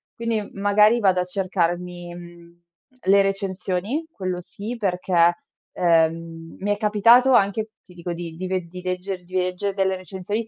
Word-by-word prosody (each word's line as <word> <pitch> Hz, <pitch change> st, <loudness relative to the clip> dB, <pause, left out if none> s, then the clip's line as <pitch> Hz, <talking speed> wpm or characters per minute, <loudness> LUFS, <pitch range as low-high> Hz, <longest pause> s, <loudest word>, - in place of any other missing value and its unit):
Quindi 230 Hz, -3 st, -2 dB
magari 210 Hz, +3 st, +4 dB
vado 190 Hz, -3 st, +3 dB
a 180 Hz, -, 0 dB
cercarmi, 180 Hz, -1 st, -2 dB
mhmm, 175 Hz, 0 st, -13 dB, 0.5 s
le 200 Hz, +1 st, +6 dB
recensioni, 195 Hz, -, -2 dB
quello 185 Hz, -, -4 dB
sì, 210 Hz, +6 st, -7 dB
perché, 180 Hz, -4 st, +2 dB, 0.4 s
ehm, 165 Hz, -1 st, +1 dB
mi 205 Hz, +2 st, -1 dB
è -, -, -5 dB
capitato 230 Hz, +5 st, +5 dB
anche, 215 Hz, 0 st, +2 dB
ti 180 Hz, -, -17 dB
dico 175 Hz, 0 st, -5 dB
di 170 Hz, -1 st, -7 dB
di 185 Hz, +2 st, -4 dB
ved 185 Hz, -2 st, -2 dB
di 180 Hz, +1 st, -8 dB
legger 185 Hz, 0 st, -4 dB
di 185 Hz, +1 st, -10 dB
leggere 185 Hz, +2 st, -1 dB
delle 190 Hz, -1 st, +1 dB
recensioni 190 Hz, +4 st, -4 dB
185 Hz, 155 wpm, -23 LUFS, 175-205 Hz, 0.5 s, le